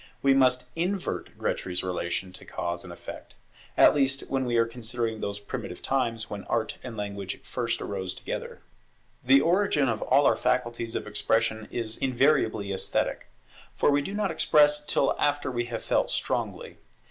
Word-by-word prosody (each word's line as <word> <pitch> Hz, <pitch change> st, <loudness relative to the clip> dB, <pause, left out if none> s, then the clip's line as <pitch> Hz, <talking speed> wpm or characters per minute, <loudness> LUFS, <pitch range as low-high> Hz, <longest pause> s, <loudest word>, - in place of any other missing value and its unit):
We 135 Hz, 0 st, +6 dB
must 130 Hz, -1 st, +4 dB
invert 180 Hz, +3 st, -2 dB
Grétry's 90 Hz, -1 st, -1 dB
relation 90 Hz, 0 st, -2 dB
of 90 Hz, -, -11 dB
cause 85 Hz, 0 st, -3 dB
and 90 Hz, -, -9 dB
effect; 85 Hz, -, -10 dB, 0.4 s
at -, -, +8 dB
least 135 Hz, -2 st, +1 dB
when 135 Hz, -1 st, 0 dB
we 120 Hz, -1 st, +1 dB
are 115 Hz, -, +4 dB
considering 115 Hz, -1 st, -3 dB
those 100 Hz, 0 st, -2 dB
primitive 100 Hz, -, -6 dB
times, 115 Hz, -4 st, 0 dB
when 100 Hz, -2 st, -6 dB
Art 115 Hz, -2 st, -1 dB
and 120 Hz, -3 st, -7 dB
Language 100 Hz, -2 st, -4 dB
first 115 Hz, -2 st, -2 dB
arose 95 Hz, -2 st, -4 dB
together. -, -, -6 dB, 0.6 s
The 135 Hz, +2 st, +6 dB
origin 170 Hz, -4 st, +3 dB
of 115 Hz, -3 st, -1 dB
all 145 Hz, -, +4 dB
our -, -, +5 dB
faculties 120 Hz, -2 st, -1 dB
of -, -, -2 dB
expression 110 Hz, +1 st, 0 dB
is 115 Hz, -2 st, -3 dB
invariably 125 Hz, -6 st, +2 dB
esthetic; 95 Hz, -, -1 dB, 0.5 s
for -, -, +3 dB
we 145 Hz, 0 st, +3 dB
do 195 Hz, +8 st, -5 dB
not 205 Hz, -3 st, 0 dB
express 150 Hz, -2 st, +4 dB
till 140 Hz, -2 st, +1 dB
after 145 Hz, -2 st, +1 dB
we 120 Hz, -1 st, -1 dB
have 115 Hz, -1 st, -5 dB
felt -, -, +1 dB
strongly. -, -, -2 dB
120 Hz, 165 wpm, -27 LUFS, 105-135 Hz, 0.6 s, at